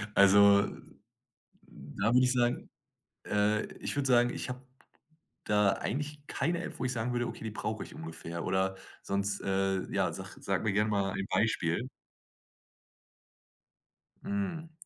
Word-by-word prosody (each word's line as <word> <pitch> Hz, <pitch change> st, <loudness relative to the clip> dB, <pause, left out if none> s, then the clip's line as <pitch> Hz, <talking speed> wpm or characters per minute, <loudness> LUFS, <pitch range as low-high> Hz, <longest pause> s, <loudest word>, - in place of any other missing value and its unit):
Also, 100 Hz, +1 st, +7 dB, 0.9 s
da 85 Hz, -, -3 dB
würde 125 Hz, -, +6 dB
ich 125 Hz, -, +3 dB
sagen 120 Hz, -1 st, 0 dB, 0.6 s
äh, 105 Hz, +1 st, +1 dB
ich -, -, -2 dB
würde 140 Hz, -1 st, 0 dB
sagen, 120 Hz, -1 st, +5 dB
ich -, -, -4 dB
habe 125 Hz, +1 st, -7 dB, 0.8 s
da 105 Hz, -1 st, +3 dB
eigentlich 145 Hz, +3 st, -4 dB
keine 170 Hz, +5 st, -1 dB
App, -, -, -4 dB
wo 125 Hz, -, -2 dB
ich 125 Hz, -, 0 dB
sagen 120 Hz, +1 st, -2 dB
würde: 120 Hz, 0 st, 0 dB
„Okay, -, -, -7 dB
die 110 Hz, -, -3 dB
brauche 110 Hz, 0 st, -3 dB
ich -, -, -12 dB
ungefähr“ 80 Hz, +1 st, -6 dB
oder 95 Hz, 0 st, 0 dB, 0.3 s
sonst 100 Hz, 0 st, -1 dB
äh, 95 Hz, -1 st, 0 dB
ja, -, -, +1 dB
sag -, -, -8 dB
sag -, -, -1 dB
mir 105 Hz, -, +1 dB
gerne 105 Hz, +2 st, +2 dB
mal 100 Hz, -2 st, 0 dB
ein 95 Hz, -, -3 dB
Beispiel. 110 Hz, +1 st, +1 dB, 2.3 s
Hm. 185 Hz, -5 st, -3 dB
105 Hz, 145 wpm, -31 LUFS, 95-125 Hz, 2.3 s, Also